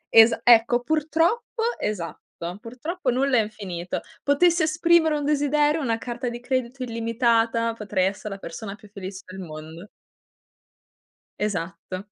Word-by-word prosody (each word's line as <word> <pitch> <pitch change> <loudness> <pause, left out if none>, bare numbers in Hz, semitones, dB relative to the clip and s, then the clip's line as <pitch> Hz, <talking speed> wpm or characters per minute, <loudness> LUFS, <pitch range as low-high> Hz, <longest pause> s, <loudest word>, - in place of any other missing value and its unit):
Esa 225 +1 +7
ecco, 240 0 +6
purtroppo 325 - 0 0.2
esatto. 180 -6 -3 0.4
Purtroppo 260 +6 -4
nulla 260 +1 +2
è - - +5
infinito. 190 -5 -5 0.2
Potessi 340 +4 +3
esprimere 320 0 +3
un 290 - -3
desiderio, 295 +1 +2
una 230 -4 0
carta 240 +1 -4
di 240 - -6
credito 255 +1 -2
illimitata, 230 -1 +1
potrei 205 -4 -1
essere 195 +2 -3
la - - -9
persona 195 +4 -7
più 210 0 -17
felice 190 -1 -8
del 185 +1 -9
mondo. 160 +2 -9 1.5
Esatto. 185 -2 -3
235 Hz, 130 wpm, -24 LUFS, 205-285 Hz, 1.5 s, Esa